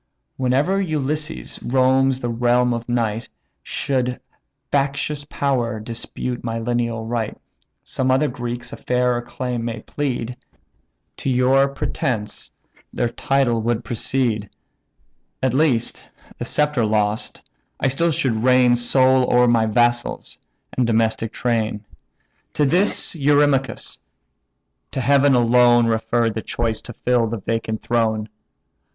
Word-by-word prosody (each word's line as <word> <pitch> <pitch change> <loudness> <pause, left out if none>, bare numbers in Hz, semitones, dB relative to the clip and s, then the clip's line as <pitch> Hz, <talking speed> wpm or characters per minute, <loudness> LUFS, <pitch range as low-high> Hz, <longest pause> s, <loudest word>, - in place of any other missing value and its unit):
Whene'er 135 +9 +1
Ulysses 155 -3 -3
roams 130 +1 +2
the 120 - -2
realm 120 +1 +2
of 115 +1 -5
night, 115 -2 -1 0.3
Should 125 -2 -2 0.5
factious 145 +1 -1
power 120 -5 -1
dispute 115 +2 -5
my 115 -1 -3
lineal 115 -1 -2
right, 115 -2 -3 0.5
Some 130 0 -2
other 135 +4 +3
Greeks 120 -1 -5
a - - -7
fairer 125 -1 0
claim 120 -1 -4
may 115 -1 -4
plead; 125 -4 -3 0.8
To - - -2
your 130 +2 +4
pretence 135 -6 -3 0.4
their 120 - -1
title 125 -2 +1
would 120 +1 -1
precede. 115 -2 -1 0.9
At 130 -2 +2
least, 135 -5 0 0.3
the - - -3
sceptre 150 -5 +1
lost, 105 0 -1 0.4
I - - +1
still 150 +6 +2
should 135 -6 0
reign 125 -1 +5
Sole 130 +1 +3
o'er 125 0 +5
my 115 -2 +3
vassals, 120 +2 0 0.4
and 125 -2 +1
domestic 115 -1 +1
train." 110 -3 -1 0.7
To 150 - +2
this 180 +8 +3
Eurymachus: 145 -3 +1 0.9
"To - - -2
Heaven 140 +1 +4
alone 120 0 +5
Refer 115 +1 +1
the 110 - -4
choice 115 -1 -2
to 120 - -9
fill 120 0 +1
the 115 +1 -3
vacant 110 +1 -3
throne. 110 -3 0
120 Hz, 120 wpm, -21 LUFS, 115-135 Hz, 0.9 s, reign